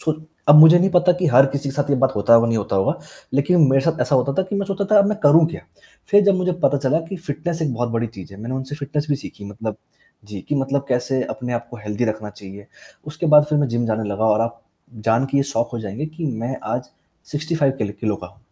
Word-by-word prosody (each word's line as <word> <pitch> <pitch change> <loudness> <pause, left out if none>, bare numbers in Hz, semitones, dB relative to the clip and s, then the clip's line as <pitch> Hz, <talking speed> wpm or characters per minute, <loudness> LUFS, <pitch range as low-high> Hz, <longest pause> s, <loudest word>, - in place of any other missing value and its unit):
छो 155 - 0 0.4
अब 145 - +9
मुझे 160 +3 +9
नहीं 190 +2 +2
पता 180 0 +4
कि 180 - 0
हर 135 +2 +7
किसी 140 +1 -4
के 135 - -6
साथ 145 0 -1
ये 140 - +3
बात 130 0 +1
होता 105 +3 +4
होगा, 115 0 +5
नहीं 115 -1 0
होता 100 -1 -2
होगा, 95 - 0 0.4
लेकिन 145 +1 +3
मेरे 135 - +3
साथ 165 +1 -1
ऐसा 145 - +1
होता 135 +1 +2
था - - +4
कि 205 - -3
मैं 200 -1 -2
सोचता 200 0 -2
था - - +7
अब 200 - +4
मैं 210 - -1
करूँ 155 +2 +6
क्या? - - -8 0.5
फ़िर 205 0 +6
जब 200 -1 +4
मुझे 180 0 0
पता 145 - +3
चला 145 +4 0
कि 190 - -5
फिटनेस 165 +1 -4
एक 145 -5 -1
बहुत 120 +1 -2
बड़ी 115 0 -1
चीज़ 100 -4 -12
है, 100 - -12
मैंने 120 +4 -5
उनसे 130 +2 -5
फिटनेस 145 0 -4
भी 145 - +2
सीखी 105 -7 -11
मतलब 105 +1 -6 0.5
जी, 105 -2 -8
कि 150 - -1
मतलब 135 0 -1
कैसे 130 +1 0
अपने 125 -1 -5
आप 120 0 -4
को 120 - -9
हेल्दी 105 +3 -2
रखना 110 -2 -4
चाहिए, 100 0 -12 0.4
उसके 155 +3 -4
बाद 150 -1 +7
फ़िर 150 - +2
मैं 145 - 0
जिम 120 0 -1
जाने 110 -1 -2
लगा 105 +2 -2
और 110 0 +3
आप 115 0 -3 0.5
जान 115 +4 +2
के 140 - 0
ये 140 - +3
शॉक 115 +1 0
हो 120 - -4
जाएँगे 110 +8 -5
कि 160 +1 -6
मैं 120 0 -4 0.2
आज - - -5 0.4
65 150 -2 0
किल 105 -2 -3
किलो 105 -2 -1
का - - -10
हूँ। - - -20
135 Hz, 265 wpm, -20 LUFS, 115-155 Hz, 0.5 s, अब